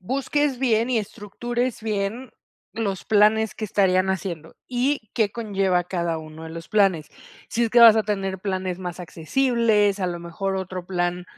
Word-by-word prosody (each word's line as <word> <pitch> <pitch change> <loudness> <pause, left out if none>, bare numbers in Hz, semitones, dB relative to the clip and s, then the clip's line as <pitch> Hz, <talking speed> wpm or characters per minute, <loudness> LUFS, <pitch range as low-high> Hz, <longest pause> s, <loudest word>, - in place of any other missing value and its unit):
busques 275 +5 -1
bien 235 -2 +1
y 245 - +2
estructures 240 +4 -4
bien, 215 +3 -3 0.4
los 200 -4 -3
planes 215 +1 +3
que 220 - -5
estarían 190 -2 +2
haciendo, 170 -4 -5
y 250 -2 -1
qué 215 -3 +2
conlleva 195 -5 0
cada 170 -2 -2
uno 155 0 -10
de 160 - -8
los 165 0 -9
planes. 195 -7 +2 0.4
Si 235 - 0
es 225 - -2
que 240 - +5
vas 230 -2 +9
a 220 - +3
tener 195 -2 -2
planes 185 -2 -3
más 180 -1 -6
accesibles, 210 - +1
a 185 - 0
lo 175 -1 -3
mejor, 190 +3 -3
otro 185 -1 -5
plan, 180 -1 -2
200 Hz, 170 wpm, -23 LUFS, 180-225 Hz, 0.4 s, vas